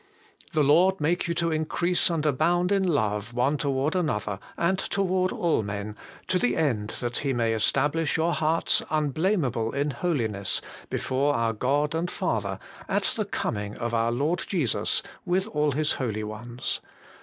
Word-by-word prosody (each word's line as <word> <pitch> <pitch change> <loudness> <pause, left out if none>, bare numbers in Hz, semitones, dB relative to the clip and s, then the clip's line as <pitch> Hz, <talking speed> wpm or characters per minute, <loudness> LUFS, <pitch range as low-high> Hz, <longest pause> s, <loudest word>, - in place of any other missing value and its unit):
The 155 - +3
Lord 175 +7 +4
make 170 +4 +1
you 170 - -1
to 170 -1 +1
increase 170 +4 +1
and 165 -3 -1
abound 170 +6 +2
in 200 -1 +3
love 110 - 0
one 135 +4 +2
toward 140 +3 0
another, 105 - -1 0.2
and 185 +3 +1
toward 185 -2 0
all 170 -8 +1
men, 100 0 -5 0.3
to 185 - +1
the 245 - +1
end 115 -10 0 0.3
He 140 -2 0
may 115 -2 +1
stablish 150 +8 +1
your 165 +1 +2
hearts 160 +1 +2
unblameable 150 - 0
in 140 +1 0
holiness 115 - 0 0.3
before 140 +2 0
our 115 -1 +1
God 145 +7 +1
and 165 +2 -1
Father 100 - -1 0.3
at - - +1
the - - -1
coming 105 0 -3
of 120 -1 -3
our 115 0 +2
Lord 150 +9 0
Jesus 155 - +1 0.2
with 185 +2 +1
all 150 -6 +1
His 155 +2 +1
holy 110 -5 -2
ones.' 115 +3 -3
145 Hz, 155 wpm, -26 LUFS, 115-170 Hz, 0.3 s, Lord